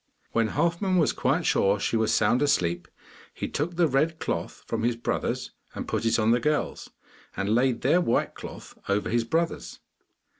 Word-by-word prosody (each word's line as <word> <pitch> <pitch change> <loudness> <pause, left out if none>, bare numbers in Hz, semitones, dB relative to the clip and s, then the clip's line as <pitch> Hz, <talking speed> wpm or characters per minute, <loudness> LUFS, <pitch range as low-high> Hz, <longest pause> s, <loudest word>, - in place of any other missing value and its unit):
When 115 -1 +2
Halfman 170 - 0
was 160 - +3
quite 145 +7 0
sure 100 +1 +2
she 105 - -1
was 110 -1 +2
sound 110 +3 +3
asleep, 85 -11 +1 0.5
he - - -3
took 170 +4 -3
the 170 -1 +3
red 155 +4 +1
cloth - - -4
from 115 - -2
his 120 +1 +1
brothers 115 - -2 0.2
and - - -5
put - - -2
it 115 - +3
on 110 0 +3
the 120 - +4
girls, 150 +4 -1 0.5
and 100 +2 0
laid 125 0 +2
their 160 +8 +3
white 120 - 0
cloth - - -10
over 100 +1 0
his 115 0 +1
brothers. 165 +7 -2
120 Hz, 180 wpm, -26 LUFS, 110-160 Hz, 0.5 s, the